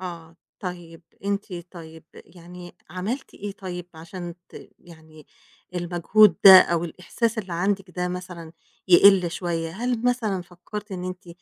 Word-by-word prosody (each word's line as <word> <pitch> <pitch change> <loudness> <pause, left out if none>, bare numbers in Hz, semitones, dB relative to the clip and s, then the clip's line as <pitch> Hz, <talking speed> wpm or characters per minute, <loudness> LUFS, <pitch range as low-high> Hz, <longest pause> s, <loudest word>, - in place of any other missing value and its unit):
آه، 170 -3 -8 0.2
طيب 175 -3 -8 0.2
أنتِ 200 -1 -3 0.2
طيب 160 -3 -12
يعني 175 0 -13
عملتِ 205 - -5
إيه 205 0 -6
طيب 180 -3 -7
عشان 170 +2 -8
ت - - -12
يعني 160 -2 -17 0.5
المجهود 175 +2 +3
ده 190 -1 +12
أو 170 0 0
الإحساس 220 +7 -3
اللي 190 -4 -5
عندِك 195 +2 -1
ده 180 0 -3
مثلًا 180 -2 -7 0.4
يقِل 185 -1 +6
شوية، 165 -2 -3
هل 240 +4 -2
مثلًا 225 -7 0
فكَّرتِ 190 +4 -9
إن 180 -1 -5
أنتِ 185 0 -7
180 Hz, 135 wpm, -24 LUFS, 170-195 Hz, 0.5 s, ده